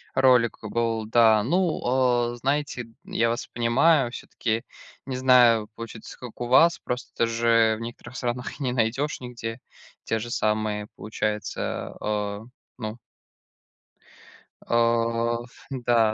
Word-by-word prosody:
Ролик 125 Hz, -3 st, +4 dB
был, 115 Hz, 0 st, -1 dB
да. 110 Hz, -2 st, +5 dB
Ну, 175 Hz, -, +1 dB
а, 120 Hz, -1 st, +2 dB
знаете, 135 Hz, -1 st, -1 dB, 0.2 s
я 115 Hz, 0 st, 0 dB
вас 120 Hz, +2 st, -3 dB
понимаю. 120 Hz, +3 st, +3 dB
Всё-таки 115 Hz, -2 st, -3 dB, 0.4 s
не 130 Hz, -1 st, -3 dB
знаю, 120 Hz, -4 st, +5 dB
получится 115 Hz, -1 st, -9 dB
как 125 Hz, -3 st, -10 dB
у 120 Hz, -, -3 dB
вас. 165 Hz, +7 st, +5 dB
Просто 125 Hz, -1 st, -2 dB
же 115 Hz, -1 st, +3 dB
в -, -, -10 dB
некоторых 120 Hz, +2 st, -8 dB
странах 125 Hz, +3 st, -3 dB
не 125 Hz, -3 st, -1 dB
найдёшь 125 Hz, +5 st, 0 dB
нигде 120 Hz, -1 st, -6 dB, 0.4 s
те 115 Hz, -, -1 dB
же 120 Hz, +2 st, -6 dB
самые, 105 Hz, -2 st, -1 dB
получается, 105 Hz, -1 st, -3 dB
э, 105 Hz, -1 st, -2 dB, 0.4 s
ну 110 Hz, -1 st, -5 dB, 1.8 s
Э 115 Hz, 0 st, +1 dB
ф -, -, -22 dB, 0.3 s
да. 120 Hz, -1 st, +4 dB
115 Hz, 125 wpm, -25 LUFS, 115-125 Hz, 1.8 s, да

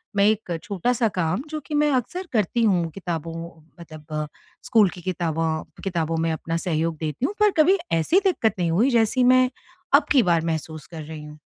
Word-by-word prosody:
मैं 200 Hz, -, +4 dB
एक 210 Hz, -5 st, 0 dB
छोटा-सा 230 Hz, +5 st, 0 dB
काम 180 Hz, +5 st, 0 dB
जो 310 Hz, -, -4 dB
कि 305 Hz, -, -7 dB
मैं 295 Hz, 0 st, +3 dB
अक्सर 355 Hz, -, -2 dB
करती 225 Hz, +1 st, +1 dB
हूँ, 180 Hz, -6 st, +2 dB
किताबों 165 Hz, -3 st, -5 dB, 0.5 s
मतलब 155 Hz, -2 st, -6 dB, 0.4 s
स्कूल 215 Hz, -4 st, +4 dB
की 180 Hz, -, -10 dB
किताबां 165 Hz, -3 st, -1 dB, 0.2 s
किताबों 165 Hz, -4 st, -1 dB
में 165 Hz, 0 st, 0 dB
अपना 165 Hz, +1 st, -3 dB
सहयोग 165 Hz, -2 st, -1 dB
देती 155 Hz, -, -2 dB
हूँ, 385 Hz, -, -1 dB
पर 420 Hz, -1 st, +5 dB
कभी 380 Hz, +6 st, +4 dB, 0.2 s
ऐसी 335 Hz, -, +3 dB
दिक्कत 290 Hz, -, +2 dB
नहीं 170 Hz, -2 st, +1 dB
हुई, 215 Hz, +11 st, +3 dB
जैसी 235 Hz, +2 st, +3 dB
मैं 255 Hz, 0 st, +5 dB, 0.5 s
अब -, -, +4 dB
की 265 Hz, -4 st, +5 dB
बार 170 Hz, -2 st, +2 dB
महसूस 160 Hz, -1 st, -4 dB
कर 160 Hz, -2 st, -8 dB
रही 155 Hz, 0 st, -8 dB
हूँ। 150 Hz, 0 st, -11 dB
175 Hz, 190 wpm, -23 LUFS, 160-240 Hz, 0.5 s, पर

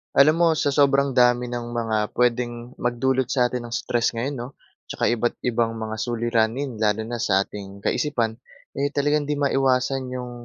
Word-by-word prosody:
Alam 150 Hz, +3 st, +6 dB
mo 170 Hz, -1 st, +5 dB
sa 145 Hz, -1 st, +1 dB
sobrang 140 Hz, -1 st, +3 dB
dami 125 Hz, -1 st, +3 dB
ng 120 Hz, -1 st, -4 dB
mga 115 Hz, -2 st, 0 dB, 0.2 s
pwedeng 120 Hz, 0 st, 0 dB
magdulot 125 Hz, +1 st, 0 dB
sa 125 Hz, -2 st, +1 dB
atin 125 Hz, -1 st, -4 dB
ng 115 Hz, -, -8 dB
stress 120 Hz, -1 st, 0 dB
ngayon 130 Hz, +5 st, -2 dB
'no 120 Hz, -, -5 dB, 0.4 s
'tsaka -, -, -5 dB
iba't 120 Hz, +1 st, -1 dB
ibang 115 Hz, -2 st, 0 dB
mga 110 Hz, -1 st, -4 dB
suliranin. 120 Hz, +2 st, -1 dB
Lalo 110 Hz, 0 st, +1 dB
na 120 Hz, +1 st, -5 dB
sa 100 Hz, -4 st, +2 dB
ating 100 Hz, 0 st, -10 dB
kaisipan 120 Hz, -6 st, -1 dB, 0.4 s
eh, 140 Hz, +1 st, +1 dB
talagang 145 Hz, +1 st, +1 dB
hindi 150 Hz, -, 0 dB
maiwasan 135 Hz, -2 st, +1 dB
yung 125 Hz, -1 st, -5 dB
120 Hz, 170 wpm, -23 LUFS, 115-135 Hz, 0.4 s, Alam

